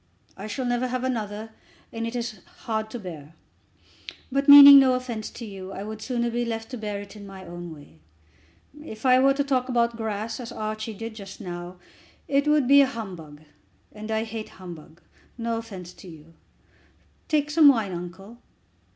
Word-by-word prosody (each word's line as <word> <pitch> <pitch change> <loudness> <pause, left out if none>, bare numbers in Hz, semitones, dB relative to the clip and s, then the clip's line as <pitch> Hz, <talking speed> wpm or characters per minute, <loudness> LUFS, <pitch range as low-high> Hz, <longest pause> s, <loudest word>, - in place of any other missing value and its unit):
I 200 +2 -8
shall 250 +5 -4
never 245 +1 0
have 255 0 -3
another, 220 -3 -3 0.4
and 230 0 -3
it 230 - -6
is 235 -4 -4 0.2
hard 220 -1 -2
to 240 - -6
bear. 165 -7 -10 1.0
But, 275 +2 0
meaning 285 0 +12
no 260 -2 +4
offence 240 -4 -4
to 235 - -9
you, 195 -2 -8
I 195 - -6
would 215 +1 -7
sooner 240 -1 -1
be 240 +1 -1
left 225 0 -5
to 250 - -5
bear 210 -2 -4
it 205 +1 -12
in 200 -1 -10
my 190 -1 -11
own 175 0 -8
way. 145 - -14 0.8
If 220 -5 -10
I 255 0 +6
were 270 +1 +4
to 285 - +1
talk 260 -2 0
about 235 -1 +2
the 230 - -13
grass 220 +1 -4
as 240 -1 -7
Archie 215 0 -5
did 225 +2 -7
just 200 -3 -10
now, 175 0 -7 0.5
it 280 +1 +1
would 300 -4 +3
be 280 +1 +7
humbug, 185 - -4 0.5
and 215 0 -9
I 220 0 0
hate 220 -1 -6
humbug. 170 -3 -12 0.3
No 230 -1 -2
offence 190 -6 -9
to - - -14
you. 160 -1 -14 0.9
Take 300 -1 0
some 310 -1 +6
wine, 225 -8 +4
uncle." 185 +6 -8
220 Hz, 185 wpm, -25 LUFS, 195-250 Hz, 1.0 s, meaning